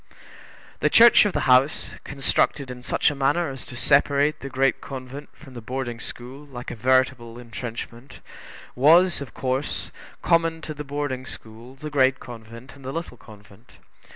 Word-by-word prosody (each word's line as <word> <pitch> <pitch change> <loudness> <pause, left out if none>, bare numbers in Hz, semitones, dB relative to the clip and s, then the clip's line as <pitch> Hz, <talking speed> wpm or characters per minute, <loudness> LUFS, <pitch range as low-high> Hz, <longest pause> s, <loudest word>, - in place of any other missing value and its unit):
The - - +2
church 230 -2 +7
of 205 - 0
the - - 0
house, 130 +3 +3
constructed 140 -1 0
in 125 0 -9
such 130 - +1
a - - -6
manner 140 +3 +1
as 135 -2 -9
to 120 - -9
separate 145 +3 +2
the 135 - -7
Great 135 +1 +1
Convent 135 +2 -8
from 140 -3 -15
the 120 - -8
Boarding 120 0 -4
school 125 +5 -9
like 125 -4 -8
a - - -6
veritable 125 -1 +1
intrenchment, 120 +2 -8 0.5
was, 165 +6 +5
of 130 -7 -9
course, 130 +2 -2 0.3
common 165 -1 +2
to 155 - -5
the 150 0 -7
Boarding 140 -2 -4
school, 115 +1 -11
the 150 +3 -8
Great 130 -2 +3
Convent, 115 +2 -11
and 140 - -16
the 130 - -5
Little 165 -4 -5
Convent. 105 0 -17
130 Hz, 165 wpm, -24 LUFS, 120-145 Hz, 0.5 s, church